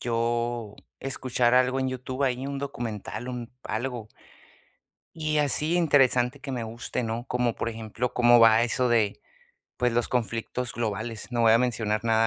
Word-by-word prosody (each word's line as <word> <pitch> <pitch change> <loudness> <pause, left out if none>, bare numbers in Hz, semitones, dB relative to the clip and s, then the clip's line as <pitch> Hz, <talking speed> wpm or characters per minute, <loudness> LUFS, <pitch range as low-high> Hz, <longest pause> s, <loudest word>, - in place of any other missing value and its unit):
yo 120 -2 -1 0.3
escuchar 125 -2 0
algo 130 +1 +3
en 130 - 0
YouTube, 130 +1 -4
ahí 130 +1 -1
un 140 0 -4
documental, 120 -3 -5
un 120 -2 -6
algo. 120 0 -4 1.1
Y 155 -1 0
así 150 +3 +2
interesante 135 -5 +3
que 135 - -6
me 120 -3 -3
guste, 115 +3 -4
¿no? 115 0 -3
Como 125 -2 0
por - - -2
ejemplo, 115 +2 -4
cómo 120 0 +6
va 115 0 +7
eso 125 +1 +1
de, 110 -4 +1 0.6
pues, 125 -1 +1
los 120 0 +1
conflictos 115 +1 -2
globales, 110 0 -4
no 120 -1 0
voy 110 - +6
a 115 - +6
mencionar 110 -3 -1
nada, 115 0 +3
120 Hz, 160 wpm, -26 LUFS, 115-130 Hz, 1.1 s, va